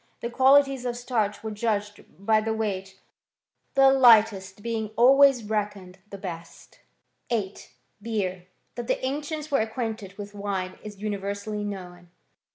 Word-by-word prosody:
The 235 - -4
qualities 270 0 +4
of 240 0 -3
starch 225 -4 -2
were 220 - -4
judged 210 -1 -2
of 190 +6 -20
by 220 0 +4
the 220 0 -2
weight; 195 -3 -4 0.8
the 270 0 +6
lightest 215 -6 +4
being 225 -2 -2
always 270 0 +6
reckoned 205 -3 -4
the 200 - -8
best. 170 -4 -9 0.5
VIII. 210 -5 -2 0.4
BEER. 190 -5 -3 0.3
That 240 -1 -6
the - - -1
ancients 300 +3 -4
were 275 - +3
acquainted 220 -3 -4
with 205 0 -8
wine 195 -2 -4
is 210 -1 -9
universally 205 0 -3
known. 180 -4 -7
215 Hz, 140 wpm, -26 LUFS, 200-240 Hz, 0.8 s, the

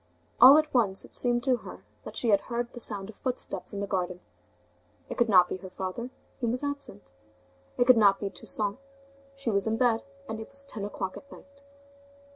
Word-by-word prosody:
All 270 +4 +11
at 310 -1 +1
once, 205 -7 +2
it - - -17
seemed 240 -1 +2
to 255 -1 +3
her - - -11 0.2
that - - -8
she 235 - +1
heard 235 +4 0
the 240 - -8
sound 205 -4 -2
of 215 - -12
footsteps 255 -1 -3
in 200 -2 -5
the - - -1
garden. 180 -3 -2 0.9
It - - -4
could 240 -1 +3
not 180 -3 +6
be - - -4
her 190 0 -10
father, 190 +6 -5 0.3
he 240 - -1
was 250 +4 -1
absent; 280 - -5 0.7
it 245 - +3
could 250 -1 +7
not 200 -3 +5
be 200 -1 -3
Toussaint, 200 +4 -3 0.6
she 275 -4 -2
was 200 +1 +1
in 220 0 0
bed, 230 -2 +2 0.3
and 220 -2 -5
it 220 - -8
was 275 0 -2
ten 235 -7 -5
o'clock 195 -2 -5
at 280 - -14
night. 280 0 -16
225 Hz, 205 wpm, -28 LUFS, 200-250 Hz, 0.9 s, All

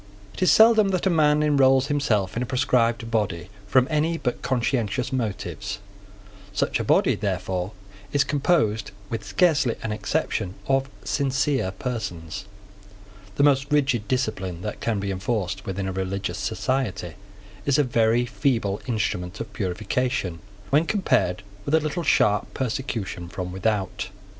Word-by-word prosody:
It - - -9
is 185 - +5
seldom 220 -2 +7
that 185 -2 0
a 190 - +3
man 150 -2 +4
enrolls 135 -3 +4
himself 110 -10 0
in 120 - -1
a - - 0
proscribed 120 -2 +1
body 95 -6 -1 0.2
from 130 +4 +4
any 155 +2 +1
but 125 -6 -2
conscientious 125 -1 0
motives. 105 -3 -3 0.8
Such - - 0
a - - -1
body, - - +4
therefore, 95 -1 -2 0.4
is 145 0 +3
composed, 140 -7 +1 0.2
with 115 -2 -3
scarcely 135 - +2
an 110 - -2
exception, 105 - -1
of 135 +1 +1
sincere 135 -5 0
persons. 95 - -5 0.9
The - - +2
most 140 0 +3
rigid 130 -7 +2
discipline 95 -8 -2
that 105 - -4
can 115 -3 0
be 100 0 -2
enforced 95 0 -2
within 95 0 -2
a 95 - -3
religious 95 0 -3
society 105 -4 -1 0.5
is 140 0 +4
a 150 - +4
very 120 -1 +2
feeble 115 -6 0
instrument 95 -6 -2
of - - -6
purification, 105 -1 -1 0.3
when 155 +4 +4
compared 95 - +1 0.2
with 140 - +1
a - - +5
little 155 +3 -2
sharp 105 - +2
persecution 115 -8 -3
from 90 0 -5
without. 95 -1 -1
115 Hz, 145 wpm, -24 LUFS, 100-135 Hz, 0.9 s, seldom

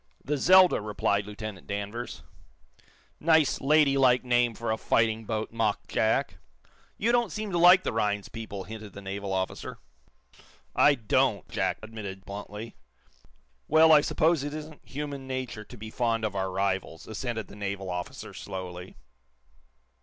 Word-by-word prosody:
"The 150 - 0
'Zelda'," 185 -3 +6
replied 100 -1 0
Lieutenant 105 -2 -7
Danvers. 100 +4 -5 1.0
"Nice, 160 -2 +3
lady 140 -1 +4
like 125 -2 +4
name 120 -2 +2
for 115 0 -3
a 110 - 0
fighting 110 -1 +1
boat," 110 0 -3
mocked 110 -3 -1
Jack. - - +1 0.6
"You 230 +3 +1
don't 240 -1 +2
seem 215 -2 -4
to 175 - 0
like 180 +2 +8
the - - -2
Rhinds 105 -2 0
people," 110 -4 -7
hinted 105 0 -9
the 100 - -9
naval 100 0 -4
officer. 95 0 -3 1.0
"I 145 - +6
don't," 110 -5 +1
Jack - - -1
admitted, 100 -4 -7
bluntly. 105 +3 -7 0.9
"Well, 160 +1 +6
I 150 -2 +8
suppose 160 0 +2
it 145 +1 -4
isn't 155 0 -9
human 140 -1 -6
nature 130 -5 -4
to 125 - -12
be 110 0 -8
fond 115 -2 0
of 105 -2 -3
our 95 -1 -1
rivals," 95 -3 -2
assented 110 -1 -4
the - - -14
naval 100 -2 -4
officer, 90 0 -6
slowly. 90 -1 -7
110 Hz, 150 wpm, -28 LUFS, 100-140 Hz, 1.0 s, like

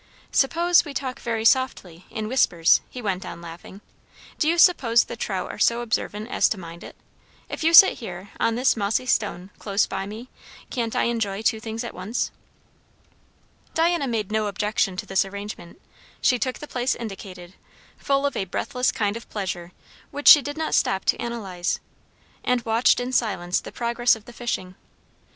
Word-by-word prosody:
"Suppose 340 +5 +3
we 290 -3 -9
talk 260 -2 -4
very 225 -2 -3
softly 210 -10 +1
in 220 -2 -4
whispers," 175 -9 +3
he 250 - -8
went 190 -3 -2
on, - - -8
laughing. 170 +4 -11 0.6
"Do 310 - +2
you 340 - +1
suppose 250 -10 +5
the - - -8
trout - - -3
are - - -10
so 235 +1 +3
observant 220 -2 -2
as - - +3
to 220 - -2
mind 170 -1 -10
it? - - -11 0.5
If - - -5
you 325 - +4
sit 360 +3 +8
here, 190 -3 -8
on 230 - +1
this 250 +3 +3
mossy 215 +3 0
stone, 200 -5 -1
close 200 -1 +1
by 195 0 -4
me, 220 +4 -8 0.4
can't 230 -3 -2
I - - +2
enjoy 220 -3 -1
two 220 0 +1
things 225 +1 -5
at 235 - -6
once?" 190 +6 -3 1.4
Diana 330 -3 +2
made 215 -4 -2
no 215 -1 0
objection 205 -2 -1
to - - -4
this 195 0 +2
arrangement. 200 -3 -8 0.4
She 250 -3 +2
took 255 +2 -2
the 295 - -9
place 250 -1 -1
indicated, 190 -5 -8 0.5
full 275 0 +1
of 280 - -1
a 195 - -1
breathless 250 +7 -1
kind 205 -1 -1
of 230 - -9
pleasure 180 -4 -4 0.4
which 290 - -4
she 295 - +10
did 290 +2 -6
not 320 0 -2
stop 190 0 +1
to - - +1
analyze; 195 -7 -3 0.6
and 250 -1 0
watched 225 +3 +3
in 245 +1 -3
silence 195 -8 0
the - - -10
progress 240 0 +1
of 220 -1 -14
the 240 - -12
fishing. 220 -6 -4
225 Hz, 180 wpm, -24 LUFS, 195-250 Hz, 1.4 s, she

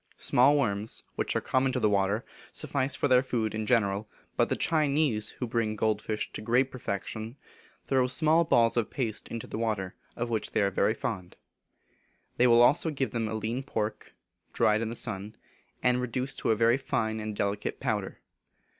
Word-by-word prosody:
Small 140 +4 +4
worms, 105 -5 -1
which - - -2
are - - +1
common 130 0 +1
to 125 - 0
the 110 - +3
water, 100 +2 +1 0.3
suffice 135 -1 -1
for - - +1
their 125 -2 +5
food 115 -5 -2
in 110 -1 -3
general, 105 -3 +1 0.3
but - - +2
the - - +1
Chinese, 145 -8 +1
who 125 - -2
bring 115 -2 -1
gold 110 0 0
fish 110 -1 -4
to - - -5
great 125 +4 +2
perfection, 110 -1 -5 0.5
throw 130 -2 +2
small 155 +5 +4
balls 115 -8 +3
of 120 -3 0
paste 115 -5 -3
into 115 -1 -6
the 110 - -6
water, 105 -5 -2 0.2
of 120 0 -3
which 110 -2 -2
they - - +2
are 100 - +1
very 105 +3 +1
fond. 95 -6 -5 1.0
They 125 - +4
give 120 - +5 0.6
them 115 -2 -1
also 110 0 -3
lean 115 +4 -2
pork, 110 -6 -4 0.4
dried 110 +1 +3
in 115 - -2
the 115 - -5
sun, 100 0 -3 0.5
and 125 0 +3
reduced 125 +2 -2
to - - -1
a 110 - +4
very 115 +3 +3
fine 110 -5 -2
and 110 -1 -4
delicate 100 +1 -2
powder. 105 -7 -3
115 Hz, 180 wpm, -28 LUFS, 105-125 Hz, 1.0 s, their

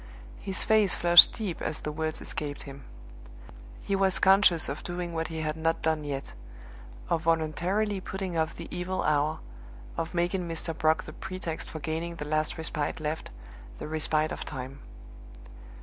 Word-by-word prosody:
His 190 -1 +1
face 215 -3 +4
flushed 175 -1 +9
deep 205 -7 -4
as 155 - -3
the 150 - -3
words 155 +1 -3
escaped 145 -2 -4
him. 140 -1 -10 1.0
He 200 - 0
was 195 -1 +2
conscious 190 -4 +5
of 140 +2 -4
doing 175 -1 -4
what 165 -1 -2
he 160 0 -5
had 155 -1 -2
not 165 +1 -1
done 160 -1 +1
yet 140 -2 -5 0.7
of 165 - 0
voluntarily 175 +6 0
putting 190 -2 -4
off 160 0 0
the 170 - -8
evil 185 +1 -2
hour; 150 +1 +1 0.6
of 165 +2 -3
making 175 +1 0
Mr. 165 0 -3
Brock 160 0 +2
the 155 - -10
pretext 185 -3 -5
for - - -6
gaining 160 +2 -3
the 150 - -6
last 155 +1 0
respite 160 -2 -2
left, 155 +1 -3 0.5
the - - -6
respite 155 0 +1
of - - -4
time. 135 -1 -7
160 Hz, 165 wpm, -28 LUFS, 155-180 Hz, 1.0 s, flushed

